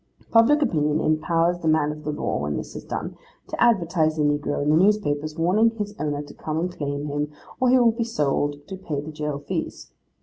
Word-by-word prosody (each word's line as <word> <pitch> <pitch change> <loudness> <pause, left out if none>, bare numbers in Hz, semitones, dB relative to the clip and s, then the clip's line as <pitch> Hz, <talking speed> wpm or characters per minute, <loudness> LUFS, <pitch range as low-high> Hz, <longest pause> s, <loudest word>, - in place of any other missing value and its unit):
Public 265 +7 +5
opinion 150 - +1
impowers 165 +3 +1
the 160 - -2
man 155 -1 +3
of 150 0 -9
law 150 - -2
when 75 0 -2
this - - -7
is - - -6
done, - - -5 0.3
to - - -5
advertise 170 -8 +2
the 155 - 0
negro 145 0 0
in 150 - +2
the - - +5
newspapers, 155 -6 +2
warning 190 +8 +3
his 205 -1 -3
owner 145 -1 -2
to 145 - -12
come 155 0 -3
and 180 +1 -3
claim 145 0 -3
him, 145 0 -2 0.3
or 255 -1 +3
he 260 - +6
will 240 -2 +5
be 230 +1 -2
sold 145 -8 -1
to 190 - -6
pay 160 -6 -4
the 150 +2 -6
jail 150 -2 -3
fees. 145 - -5
155 Hz, 210 wpm, -24 LUFS, 145-190 Hz, 0.3 s, he